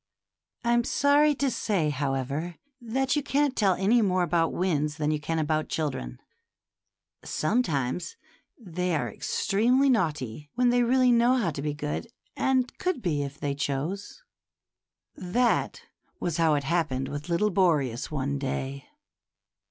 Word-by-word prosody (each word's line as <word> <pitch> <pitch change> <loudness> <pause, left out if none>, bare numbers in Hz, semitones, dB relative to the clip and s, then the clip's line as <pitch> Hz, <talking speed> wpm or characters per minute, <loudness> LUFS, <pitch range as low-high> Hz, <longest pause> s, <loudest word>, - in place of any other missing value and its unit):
I'm 240 0 +3
sorry 285 +4 +3
to 275 -1 0
say, 185 -10 0
however, 140 +4 -2 0.3
that 260 +4 0
you 295 - +1
can't 280 -1 +1
tell 195 -4 +3
any 220 +6 +3
more 185 -3 +2
about 170 -1 +1
winds 150 -5 -1
than 150 -1 0
you 155 - 0
can 165 +2 -2
about 155 0 0
children; 65 - -3 1.0
some 215 +11 +1
times 150 - -2 0.4
they 180 -5 -2
are 125 -6 -1
extremely 250 +7 +2
naughty 150 - -1
when 245 0 +3
they 245 0 +3
really 250 +1 +4
know 240 +2 +4
how 215 -10 0
to 140 - -5
be 150 0 -2
good, 150 +9 -4 0.3
and 260 -2 +1
could 365 -9 -1
be 155 -6 0
if 140 0 -6
they 140 -1 -1
chose. 145 - -4 0.9
That 235 +7 0 0.4
was 170 -3 -2
how 160 -2 +3
it 145 - -1
happened 135 -4 0
with 145 +3 -6
little 205 +5 +2
Boreas, 150 - +1
one 140 -1 -2
day. 135 0 -4
170 Hz, 145 wpm, -27 LUFS, 145-240 Hz, 1.0 s, really